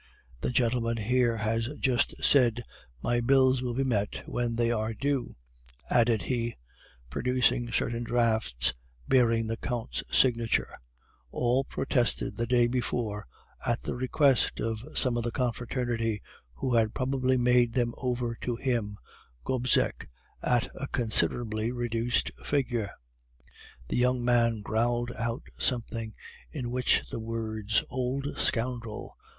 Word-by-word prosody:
This - - -1
gentleman 115 -1 +1
here 120 +1 +2
has 110 +1 0
just 125 -3 0
said, 120 -4 +5 0.4
"My 120 0 +1
bills 130 +1 +4
will 125 -2 -2
be 135 - +1
met 105 -6 -1
when 120 -1 -2
they 120 0 +2
are 110 -1 -1
due,"' 140 0 -1 0.6
added 115 -5 +3
he, 120 +1 -2 0.6
producing 125 - +1
certain 115 0 -1
drafts 110 - +2 0.3
bearing 115 -3 +3
the 115 +1 -3
Count's 110 - -3
signature, 115 -3 +2 0.5
all 125 - +1
protested 125 -3 0
the 115 0 -2
day 120 0 +4
before 120 -3 -2 0.4
at 120 0 0
the - - -3
request 130 +1 +2
of 115 0 -2
some 125 -2 +3
of 120 - -1
the 120 - 0
confraternity, 120 -3 -1 0.4
who 125 - -2
had 110 -2 +2
probably 130 0 +1
made 120 -1 +3
them 120 -2 +1
over 125 -2 -2
to 120 - -2
him 115 -5 -1 0.5
(Gobseck) 125 -1 +1 0.3
at 120 -1 +1
a 140 - -5
considerably 110 -1 +1
reduced 120 -1 0
figure. 125 -7 0 1.0
"The - - -2
young 125 0 +2
man 115 -2 +3
growled 120 +3 0
out 115 +2 -3 0.2
something, 115 -3 -2 0.4
in 125 -6 -4
which 125 0 +2
the - - -4
words 110 -1 -1
'Old 130 +3 -2
scoundrel! 115 -2 -2
120 Hz, 130 wpm, -28 LUFS, 115-125 Hz, 1.0 s, said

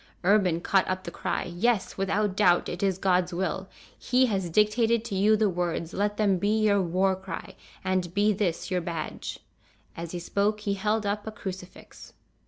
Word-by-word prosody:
Urban 185 -3 +3
caught 190 +2 +2
up 185 0 -2
the 170 - -6
cry: - - -2
"Yes, 195 +5 0
without 195 +1 0
doubt, 180 -4 +4
it 175 - -5
is 195 -2 +1
God's 180 -2 +1
will. 190 +1 -2 0.3
He 255 +1 +2
has 195 -7 -1
dictated 220 +4 +2
to 235 - -5
you 210 +3 +4
the 215 0 +3
words, 175 -2 -2
let 205 +1 -1
them 200 -4 +2
be 205 +4 +1
your 205 -2 +3
war 185 +2 +1
cry, 190 0 -7 0.3
and 185 -2 0
be 210 +1 +3
this 190 -2 -2
your 180 -1 +1
badge!" 165 -2 -5 0.5
As 170 0 -6
he 180 - -4
spoke 205 +4 0
he 205 -1 -1
held 210 +2 0
up 205 +1 -2
a - - -3
crucifix. 185 -3 -9
195 Hz, 185 wpm, -27 LUFS, 180-210 Hz, 0.5 s, doubt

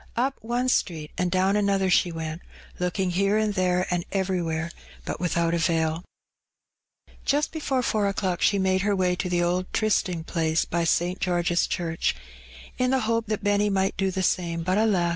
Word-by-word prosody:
Up 260 +3 +1
one 240 +3 -1
street 160 -11 0
and 180 0 0
down 190 +2 +2
another 200 -2 +2
she 180 - +3
went, 160 0 -5 0.4
looking 180 +1 0
here 195 +3 +2
and 215 -1 +1
there 180 -1 +1
and 175 -1 0
everywhere, 170 -4 -1 0.3
but - - -4
without 170 -1 0
avail 165 -1 +2 0.9
Tempted. - - -59
93 - - -23
Just 290 +2 +1
before 275 -5 -1
four 215 -3 +1
o'clock 190 -3 -1
she 200 - +3
made 190 -1 +2
her 200 +1 +1
way 180 -1 +1
to 180 0 -3
the 175 -1 +1
old 180 +1 -1
trysting 185 -6 +1
place 160 -1 0
hy 170 0 +1
St. 175 +3 +1
George's 175 -1 +1
Church, 165 -1 -1 0.6
in 250 0 +2
the 265 0 +2
hope 230 0 0
that 215 -1 -2
Benny 205 0 +2
might 195 -1 +1
do 195 0 0
the 190 0 -2
samej 170 -2 0
but, 185 +3 +2
ftka! 195 -6 +2
185 Hz, 185 wpm, -25 LUFS, 175-205 Hz, 0.9 s, she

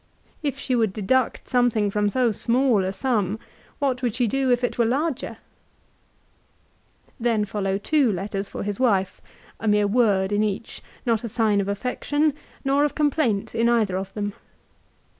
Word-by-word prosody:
If 285 -3 -2
she 260 -2 -1
would 220 -5 +1
deduct 230 +5 0
something 235 -5 +2
from 210 0 +1
so 245 +1 +2
small 235 -1 +2
a 185 - -1
sum, 210 -2 0 0.4
what 265 -3 0
would 240 -4 -1
she 250 -1 +2
do 265 +4 0
if 245 0 +2
it 245 - -1
were - - +5
larger? 275 +4 -1 1.7
2 - - -30
Then 225 -3 +1
follow 195 -1 -1
two 270 +3 +2
letters 195 +1 -3
for - - -5
his 205 -1 -3
wife, 200 -7 +1 0.4
a 225 - -3
mere 210 0 +4
word 200 -3 +2
in 205 0 +2
each, 210 +1 -3 0.2
not 230 -2 +1
a 235 - -3
sign 210 -2 +2
of 195 - -4
affection, 275 +8 0 0.3
nor 275 +1 +3
of 295 - 0
complaint 285 -9 +1
in 230 +1 +2
either 220 -6 +2
of 190 +1 -4
them. 205 -1 -2
225 Hz, 170 wpm, -24 LUFS, 205-255 Hz, 1.7 s, were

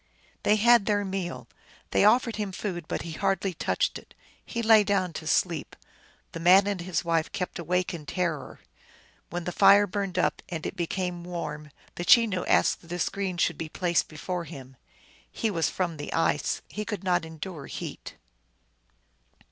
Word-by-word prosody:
They 210 - +4
had 235 0 +5
their 205 -1 +1
meal; 190 -2 -4 0.4
they - - +3
offered 230 +1 +4
him 205 -2 -2
food, 180 -4 -5
but - - -3
he 170 - -6
hardly 195 +2 0
touched - - -1
it. - - -21 0.3
He 235 -1 -4
lay 220 -1 +7
down 195 -4 0
to 155 - -6
sleep. 165 -1 0 0.6
The 165 - -6
man 185 +4 +6
and 200 -3 -2
his 175 -1 -2
wife 165 -1 +1
kept 180 -1 -4
awake 180 +2 -1
in 155 -4 -8
terror. 170 -5 -3 0.7
When 175 0 -4
the 180 - -3
fire 200 +2 +6
burned 195 -1 -3
up, 180 - +1
and 165 -3 -5
it - - -4
became 175 0 -3
warm, 155 -4 -5 0.2
the 175 - -5
Chenoo 205 -3 +5
asked - - +3
that 170 - -15
a 175 - -2
screen 190 0 -2
should - - +1
be 160 - -4
placed 175 +1 0
befure 170 +3 -4
him. 135 -4 -10 0.6
He 225 - -1
was 165 -4 +1
from 175 -4 -2
the 145 - -6
ice; 165 0 0
he 210 - -5
could 210 -2 -5
not 180 -2 +2
endure 160 -2 -7
heat. - - -7
180 Hz, 175 wpm, -27 LUFS, 165-200 Hz, 0.7 s, lay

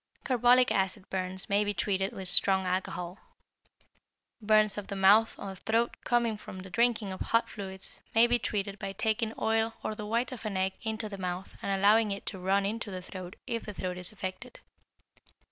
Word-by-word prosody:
Carbolic 250 -1 +4
acid 190 0 0
burns 185 0 -1
may 205 0 +3
be 205 0 -2
treated 195 +1 0
with 190 -1 -6
strong 190 +1 +3
alcohol. 180 0 -2 1.2
Burns 215 -1 +4
of 205 -1 -6
the 200 - -4
mouth 200 +4 +5
or 195 -1 -6
throat 225 +5 0
coming 235 -3 +2
from 185 -2 -9
the 190 0 -11
drinking 225 -1 +2
of 185 - -6
hot 230 0 +2
fluids, 190 -2 -7
may 225 +1 +8
be 240 0 +2
treated 200 -2 -2
by 195 0 -4
taking 220 +2 0
oil 225 0 +1
or - - -2
the 210 -1 -6
white 235 +4 0
of 255 - -7
an 210 -3 -2
egg 190 0 +1
into 220 -1 -2
the 200 -2 -7
mouth 180 0 -4
and - - -3
allowing 210 +2 +5
it 200 0 -4
to 190 - -5
run 195 +2 +2
into 220 +1 -3
the 185 -2 -6
throat 185 0 -8
if 230 -1 -3
the 210 - -7
throat 180 -1 -3
is 180 - -4
affected. 200 +5 -7
200 Hz, 195 wpm, -30 LUFS, 190-225 Hz, 1.2 s, may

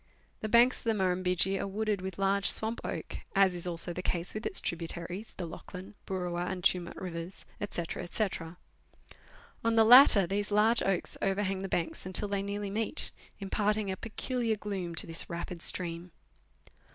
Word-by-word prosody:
The 215 - -4
banks 240 +3 +5
of - - -15
the 225 - +2
Murrumbidgee 185 0 +1
are - - -2
wooded 210 0 -1
with 190 -1 -6
large 195 0 +3
swamp 220 +1 +2
oak, - - -5 0.2
as 195 -2 +5
is 175 0 -4
also 175 0 0
the 180 - -4
case 175 -1 -2
with 215 - -3
its - - 0
tributaries, 170 +4 -5
the 180 - -4
Lachlan, 180 +4 -9
Boorowa, 180 -2 -2
and 180 -1 -5
Tumut 175 -1 +1
rivers, 175 0 -6 0.2
&c., 175 - -2 0.3
&c. 215 +2 0 1.4
On 230 0 +1
the 225 -1 +6
latter 240 -5 +9
these 205 +3 -2
large 215 +3 +3
oaks 195 -2 -1
overhang 195 -1 0
the 195 - -5
banks 170 +1 -2
until 185 +3 +1
they 200 -1 -1
nearly 200 0 -4
meet, 220 +1 +1 0.3
impart 210 +1 0
ing 205 -3 -2
a - - -2
peculiar 230 +2 -2
gloom 195 -5 -5
to - - +1
this 165 0 -2
rapid 170 0 -6
stream. 170 0 +1
195 Hz, 175 wpm, -30 LUFS, 180-210 Hz, 1.4 s, latter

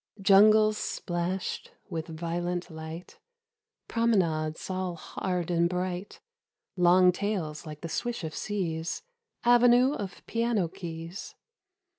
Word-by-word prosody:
Jungles 215 +2 +6
splashed 175 +1 -3
with 165 -4 -4
violent 175 +2 -3
light, 160 +2 -8 0.7
Promenades 170 -9 +1
all 185 -2 -2
hard 180 +1 -3
and 170 0 +3
bright, 180 +1 -3 0.6
Long 180 0 +6
tails 180 -6 -3
like 150 -1 -8
the 170 - -4
swish 235 +4 -3
of 155 -1 -4
seas 170 - -3 0.4
Avenue 245 +2 +5
of 195 -9 -6
piano 230 -5 0
keys. 165 +2 -7
180 Hz, 105 wpm, -28 LUFS, 165-205 Hz, 0.7 s, Jungles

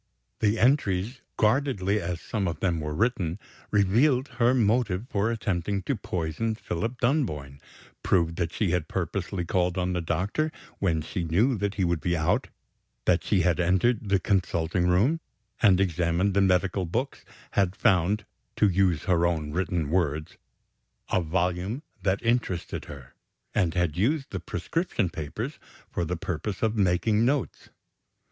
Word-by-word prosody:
The 105 +1 +2
entries, 120 -2 +1 0.2
guardedly 105 -4 +2
as 85 0 -4
some 100 -3 -2
of 85 - -3
them 85 -4 0
were 75 -1 -4
written, 95 -5 0 0.3
revealed 125 +7 +3
her 120 +2 +4
motive 110 -3 +1
for 100 +2 +1
attempting 100 -4 -1
to 135 - -1
poison 95 +3 -2
Philip 115 +5 -4
Dunboyne; 75 - -1 0.4
proved 85 -2 +1
that 85 -2 -1
she 100 -2 0
had 90 -3 0
purposely 90 -3 -3
called 90 +1 0
on 90 0 0
the 90 - -1
doctor 95 - -1 0.3
when 80 -5 +1
she 90 +3 -3
knew 100 +11 +2
that 100 0 -1
he 95 - 0
would 85 -3 0
be 85 -1 0
out, 80 - +1 0.6
that 90 -1 +3
she 100 -4 +2
had 85 0 +2
entered 95 +5 +2
the 100 -1 +3
consulting 90 -3 0
room, 110 - +3 0.4
and 95 -4 +5
examined 90 +1 +1
the 100 - +3
medical 95 0 +2
books, 125 +11 -3 0.3
had 95 -2 +1
found 100 -1 +2 0.3
(to 105 - +4
use 90 -5 +2
her 85 -2 +3
own 80 -3 -2
written 85 -3 -1
words) 80 -4 0 0.8
"a 95 - +3
volume 90 - -1 0.2
that 100 +2 0
interested 115 -7 -1
her," 65 -2 -11 0.4
and 85 -6 +1
had 90 -4 +1
used 135 - 0
the - - -3
prescription 165 - -2
papers 75 -4 -5 0.3
for 85 - -1
the 90 +2 -2
purpose 90 +4 -4
of 110 0 +2
making 105 +3 +2
notes. 135 +2 -1
95 Hz, 155 wpm, -27 LUFS, 85-110 Hz, 0.8 s, and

